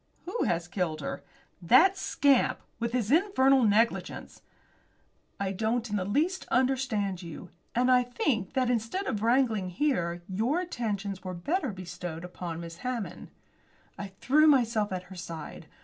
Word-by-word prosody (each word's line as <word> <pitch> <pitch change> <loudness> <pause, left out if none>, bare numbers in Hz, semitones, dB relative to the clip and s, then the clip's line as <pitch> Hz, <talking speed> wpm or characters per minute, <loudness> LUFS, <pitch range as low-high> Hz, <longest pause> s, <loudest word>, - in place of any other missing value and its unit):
"Who 375 +7 -1
has 170 0 0
killed 175 -4 -2
her?" - - -5 0.4
"That 260 - +6
scamp; 280 -8 +2 0.2
with 235 0 -1
his 240 -2 -1
infernal 275 -6 +4
negligence." 220 +3 0 1.0
"I 195 -1 -1
don't 225 +4 -1
in - - 0
the 190 -3 -1
least 310 - 0
understand 245 -8 0
you. 170 -3 -9 0.2
And 250 +2 +3
I 250 0 +6
think 245 - -1
that 255 -2 +2
instead 240 - -1
of 210 - -2
wrangling 230 -5 +2
here 175 - -1
your 225 - 0
attentions 210 - -3
were 185 -1 -5
better 285 - -1
bestowed 175 -3 -7
upon 175 -2 -6
Miss 165 0 -8
Hammond." 250 -2 -5 0.7
I 205 - -6
threw 275 +11 +3
myself 230 -7 +3
at 185 -1 -3
her 190 - -12
side. 165 -3 -8
225 Hz, 150 wpm, -29 LUFS, 185-260 Hz, 1.0 s, That